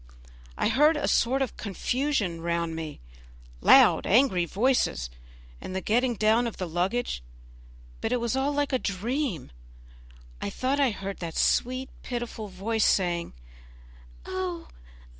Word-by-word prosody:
I - - +1
heard 300 +6 +4
a - - -1
sort 265 +3 +2
of 255 - -6
confusion 215 - -1
round 170 -1 -1
me, 160 -2 -6 0.6
loud, - - +6
angry 200 -6 +4
voices, 185 - 0 0.5
and 185 - -6
the - - 0
getting 240 +4 +1
down 220 +3 +3
of 230 - -6
the 185 - -3
luggage, 180 - -1 0.8
but 225 - -1
it 250 - +1
was 235 +1 -1
all 270 +2 +1
like 290 -1 -1
a 260 - +2
dream. 220 - -2 0.9
I - - -2
thought 265 - -1
I 275 -2 +4
heard 195 -2 -6
that 165 -2 -5
sweet, 255 +2 +1
pitiful 240 -3 -5
voice 205 +4 -1
saying, 175 -3 +1 0.9
"Oh! 185 -2 -4
220 Hz, 140 wpm, -27 LUFS, 180-255 Hz, 0.9 s, loud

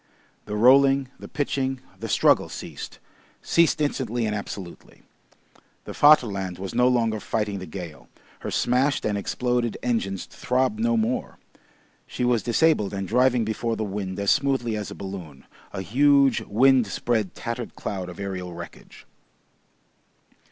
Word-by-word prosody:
The 105 - -4
rolling, 135 +3 +5
the - - -9
pitching, 135 -3 -2 0.2
the - - -5
struggle - - +3
ceased, - - -8 0.5
ceased 170 -2 +3
instantly 120 -5 -1
and 105 - -1
absolutely. 100 -3 -8 0.8
The - - -7
Vaterland 100 -11 +4
was 95 0 -6
no 125 - +3
longer 115 -3 +1
fighting 105 -2 -2
the 95 - -8
gale; 85 -2 -8 0.3
her - - -5
smashed 130 +4 +1
and 105 - 0
exploded 120 +3 -1
engines 100 -6 -1
throbbed 125 -3 -1
no 115 +1 +2
more; 115 +3 -1 0.7
she - - -4
was 120 -2 +2
disabled 120 -5 +2
and 95 -1 -3
driving 125 +1 +3
before 115 +1 -2
the 110 - -3
wind 100 -2 -4
as 100 -1 +2
smoothly 130 -5 +1
as 105 -1 -4
a - - -8
balloon, 90 -8 -8 0.3
a 95 - -5
huge, 140 +4 +4
windspread, 120 -3 +2
tattered 115 0 -5
cloud 95 -3 -5
of 90 - -10
aerial 90 -3 -5
wreckage. 85 0 -11
115 Hz, 140 wpm, -24 LUFS, 100-125 Hz, 0.8 s, rolling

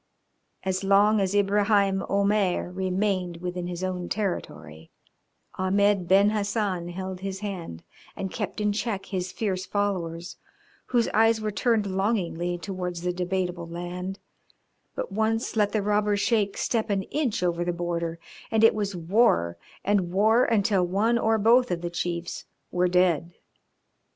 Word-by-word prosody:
As 190 0 -1
long 205 +2 +4
as 195 +1 0
Ibraheim 200 -1 +3
Omair 200 -3 +1
remained 185 -2 -1
within 180 0 -4
his 180 0 -5
own 180 -1 -3
territory 80 - -4 0.7
Ahmed 195 0 +2
Ben 200 +3 +5
Hassan 200 -4 -1
held 185 +1 -5
his 195 0 -5
hand 175 - -6 0.3
and 190 -1 -4
kept 210 -1 -4
in 210 0 +1
check 205 -1 -2
his 185 -2 -3
fierce 190 -4 -2
followers, 175 -4 -2 0.5
whose 240 -2 +2
eyes 225 0 +3
were 215 -1 -2
turned 225 0 +1
longingly 185 -3 -1
towards 180 -1 -5
the 180 0 0
debatable 180 -1 -2
land, 175 +3 -5 0.8
but - - -4
once 220 +3 0
let 210 -2 +2
the 215 -2 0
robber 210 0 +2
Sheik 205 -2 +1
step 225 -2 -1
an 195 -1 0
inch 260 -6 -1
over 175 -1 0
the 175 - 0
border, 170 -1 -3 0.3
and 220 0 +2
it 225 - +7
was 205 -2 -2
war, 170 - +2 0.3
and 195 -4 +1
war 220 +6 +4
until 205 -4 +2
one 210 +7 +1
or 225 0 +2
both 235 +4 +4
of 170 -1 -2
the 175 0 -4
chiefs 170 0 -3 0.3
were 180 0 +2
dead. 175 -2 +2
195 Hz, 145 wpm, -26 LUFS, 175-210 Hz, 0.8 s, it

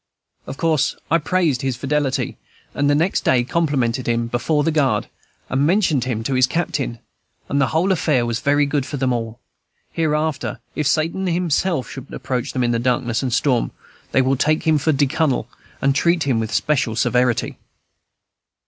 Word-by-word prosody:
Of 135 - -6
course 160 -4 +1 0.2
I 165 - +4
praised 160 -5 +1
his 135 -2 -1
fidelity, 140 +1 -1 0.3
and 145 0 +1
the 145 - +4
next 165 +6 +1
day 125 -2 +3
complimented 130 -5 0
him 115 0 +1
before 120 +6 0
the 165 - +1
guard, 135 -9 +1 0.4
and 135 +2 0
mentioned 165 - +2
him 115 -4 -2
to 135 - -2
his 130 0 +4
captain; 135 -6 -2 0.5
and 140 +1 0
the 135 - +3
whole 170 +5 +1
affair 150 -9 +2
was 115 -1 -2
very 145 +1 +2
good 145 -1 0
for 145 - -5
them 130 -1 +1
all. 115 -1 -4 0.5
Hereafter, 155 -5 -1
if 150 -2 -1
Satan 165 +6 0
himself 170 -3 0
should 135 0 -9
approach 125 -2 -3
them 125 - 0
in 120 - +1
darkness 120 -2 0
and 130 -2 -2
storm, 125 0 +1 0.4
they 130 - +3
will 135 +1 +1
take 155 +4 +1
him 155 -2 +3
for 155 +3 +1
"de 145 0 +2
Cunnel," 140 0 0 0.4
and 135 0 +4
treat 170 +3 +2
him 130 -5 +1
with 110 -1 -3
special 130 -7 0
severity. 125 0 +1
140 Hz, 175 wpm, -20 LUFS, 125-155 Hz, 0.5 s, I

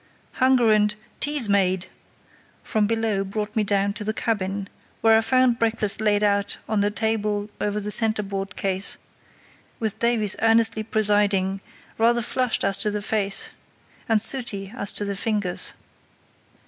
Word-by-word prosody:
Hunger 255 -3 +3
and 210 -1 +2 0.2
"Tea's 290 -5 +1
made!" 190 -2 +2 0.8
from 215 -1 0
below 225 -3 0
brought 210 +2 -5
me 220 - +2
down 200 0 0
to 210 0 -4
the 215 +1 -2
cabin, 200 -3 -2 0.3
where 225 0 +5
I 220 - +4
found 255 0 +2
breakfast 220 -3 0
laid 210 -1 +2
out 200 -1 +1
on 215 -1 0
the 205 0 +2
table 210 -1 -1
over 210 0 -1
the 210 0 -4
centreboard 205 -3 0
case, 190 0 -1 0.8
with 220 -3 -2
Davies 230 -4 +2
earnestly 225 -1 +3
presiding, 205 -3 +1 0.4
rather 235 +1 +3
flushed 250 0 0
as 195 0 +2
to 210 - +1
the 210 0 -4
face, 200 -2 +1 0.6
and 225 -1 +3
sooty 220 -5 -1
as 200 -6 +1
to 205 - -1
the 200 0 -3
fingers. 205 -3 0
210 Hz, 150 wpm, -23 LUFS, 200-225 Hz, 0.8 s, where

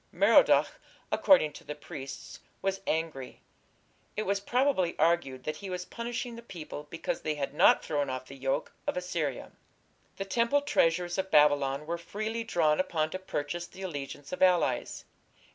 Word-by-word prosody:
Merodach, - - +5 0.3
according 210 - +5
to - - -11
the 150 - -6
priests, 135 -2 -8 0.2
was 195 0 -1
angry; 155 -5 -3 0.7
it 215 - 0
was 200 0 0
probably 245 -5 +1
argued 155 -5 +1
that 155 - -3
he 200 - -7
was 180 -1 -4
punishing 240 +2 -5
the 235 - -9
people 155 -8 -8
because 165 - -3
they 155 -1 -1
had 140 -1 -3
not - - +5
thrown 145 -3 -1
off 130 0 -4
the 135 - -11
yoke 135 0 -2 0.2
of - - -1
Assyria. 170 -7 -3 0.7
The 195 - -3
temple 235 +7 +2
treasures 175 - +1
of 190 0 -2
Babylon 145 -2 +4
were 170 +2 -3
freely 215 +6 -4
drawn 160 -9 +2
upon 160 -4 0
to 185 - -4
purchase 175 -1 -4
the 190 - -11
allegiance 145 -4 -6
of 180 - -5
allies. 180 -2 +2
170 Hz, 160 wpm, -30 LUFS, 145-195 Hz, 0.7 s, Merodach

